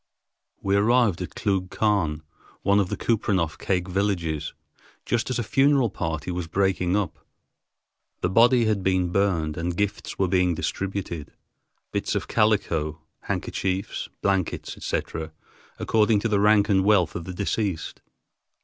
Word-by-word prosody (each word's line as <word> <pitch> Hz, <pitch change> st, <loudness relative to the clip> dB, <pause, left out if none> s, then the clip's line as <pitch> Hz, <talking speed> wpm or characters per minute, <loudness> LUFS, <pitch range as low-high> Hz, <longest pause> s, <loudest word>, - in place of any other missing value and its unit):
We 100 Hz, 0 st, +2 dB
arrived 105 Hz, -2 st, +3 dB
at 90 Hz, -, -6 dB
Klugh 95 Hz, -3 st, 0 dB
Quan, 90 Hz, -9 st, 0 dB, 0.4 s
one 100 Hz, +1 st, +4 dB
of 95 Hz, -3 st, 0 dB
the -, -, -3 dB
Kupreanof 95 Hz, -8 st, 0 dB
Kake 90 Hz, -2 st, -1 dB
villages, 90 Hz, -5 st, -1 dB, 0.5 s
just 120 Hz, +1 st, 0 dB
as 130 Hz, -, -1 dB
a 120 Hz, -, -1 dB
funeral 135 Hz, -1 st, +3 dB
party 80 Hz, -2 st, -3 dB
was 90 Hz, -1 st, -3 dB
breaking 95 Hz, 0 st, +1 dB
up. 105 Hz, -2 st, -2 dB, 1.0 s
The -, -, +2 dB
body 120 Hz, +4 st, +5 dB
had 105 Hz, -3 st, +1 dB
been 95 Hz, -2 st, +1 dB
burned 85 Hz, -6 st, +1 dB
and 85 Hz, +1 st, -2 dB
gifts 105 Hz, 0 st, -2 dB
were 95 Hz, -, +2 dB
being 90 Hz, -1 st, +2 dB
distributed—bits 95 Hz, -4 st, -5 dB
of -, -, -2 dB
calico, 80 Hz, -8 st, +1 dB, 0.2 s
handkerchiefs, 95 Hz, +1 st, -2 dB
blankets, 95 Hz, -3 st, -1 dB
etc., 80 Hz, -1 st, -4 dB, 0.4 s
according 110 Hz, -1 st, +2 dB
to 115 Hz, -, 0 dB
the 105 Hz, -3 st, +1 dB
rank 105 Hz, 0 st, +4 dB
and 95 Hz, -2 st, +3 dB
wealth 95 Hz, -5 st, +3 dB
of 85 Hz, -, -5 dB
the 95 Hz, -, -6 dB
deceased. 100 Hz, -3 st, -2 dB
95 Hz, 140 wpm, -25 LUFS, 85-105 Hz, 1.0 s, body